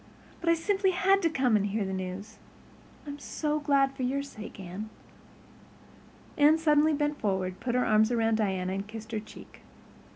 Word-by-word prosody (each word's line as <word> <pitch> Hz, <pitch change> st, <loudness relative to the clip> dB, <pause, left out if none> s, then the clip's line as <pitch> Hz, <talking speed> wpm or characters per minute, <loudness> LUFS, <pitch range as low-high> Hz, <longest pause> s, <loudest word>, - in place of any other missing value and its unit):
But 340 Hz, -, -1 dB
I 335 Hz, -, +5 dB
simply 385 Hz, +2 st, +1 dB
had 390 Hz, 0 st, +4 dB
to 335 Hz, -, +2 dB
come 260 Hz, -7 st, +2 dB
and 205 Hz, -1 st, +2 dB
hear 205 Hz, 0 st, -1 dB
the 190 Hz, -, -4 dB
news. 190 Hz, +3 st, -6 dB, 0.7 s
I'm 290 Hz, 0 st, -7 dB
so 300 Hz, +1 st, -2 dB
glad 275 Hz, -2 st, +2 dB
for 270 Hz, -, -8 dB
your 270 Hz, +3 st, 0 dB
sake, 215 Hz, -7 st, -10 dB
Anne." 190 Hz, +4 st, -7 dB, 1.5 s
Anne 300 Hz, +2 st, +6 dB
suddenly 305 Hz, -1 st, +3 dB
bent 295 Hz, 0 st, -1 dB
forward, 190 Hz, -3 st, -1 dB
put 240 Hz, 0 st, -2 dB
her 250 Hz, -, +2 dB
arms 215 Hz, 0 st, +4 dB
about 225 Hz, -2 st, +1 dB
Diana, 190 Hz, -4 st, 0 dB
and 195 Hz, +1 st, -4 dB
kissed 220 Hz, +1 st, -9 dB
her 220 Hz, -, -1 dB
cheek. 215 Hz, -, -13 dB
240 Hz, 175 wpm, -28 LUFS, 205-295 Hz, 1.5 s, Anne